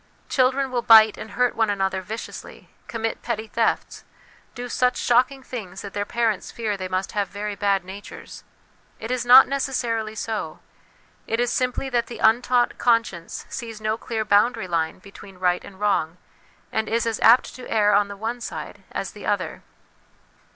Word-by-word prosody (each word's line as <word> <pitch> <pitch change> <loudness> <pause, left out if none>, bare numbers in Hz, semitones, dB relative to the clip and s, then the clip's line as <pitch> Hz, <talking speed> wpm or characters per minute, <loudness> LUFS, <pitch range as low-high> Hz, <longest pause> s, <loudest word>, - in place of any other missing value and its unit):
Children 265 +1 +2
will 245 -1 0
bite 220 -2 +7
and 220 - -8
hurt 250 0 +2
one 225 -2 +1
another 195 -2 -1
viciously, 215 +5 -8 0.2
commit 225 -1 -3
petty 225 -2 -3
thefts, 225 +1 -1 0.5
do 245 -1 -5
such 250 0 +1
shocking 255 +2 +2
things 220 -9 -7
that 200 - -8
their 205 0 -2
parents 230 -4 -1
fear 220 -3 -2
they 185 -1 -5
must 185 +1 -2
have 205 -2 -1
very 205 +2 -5
bad 200 -2 0
natures: 195 +2 -10 0.6
it 225 +2 -5
is 245 -1 -2
not 255 +2 +9
necessarily 240 -5 -2
so; 220 -1 -4 0.7
it 225 - -1
is 245 0 +1
simply 255 +1 -1
that 240 -3 0
the 240 - -8
untaught 240 +2 +2
conscience 230 -8 0
sees 225 -3 -7
no 215 0 -1
clear 225 -1 -4
boundary 205 0 +3
line 165 -2 -1
between 195 0 -14
right 180 -1 +1
and 195 -1 -13
wrong, 180 -5 0 0.5
and 220 0 -1
is 230 +1 +1
as 225 -2 -1
apt 235 +3 +5
to 255 - -10
err 210 -2 +3
on 205 0 +4
the 200 0 -8
one 230 +4 -4
side - - -7
as - - -4
the - - -9
other. - - -2
220 Hz, 170 wpm, -23 LUFS, 200-240 Hz, 0.7 s, not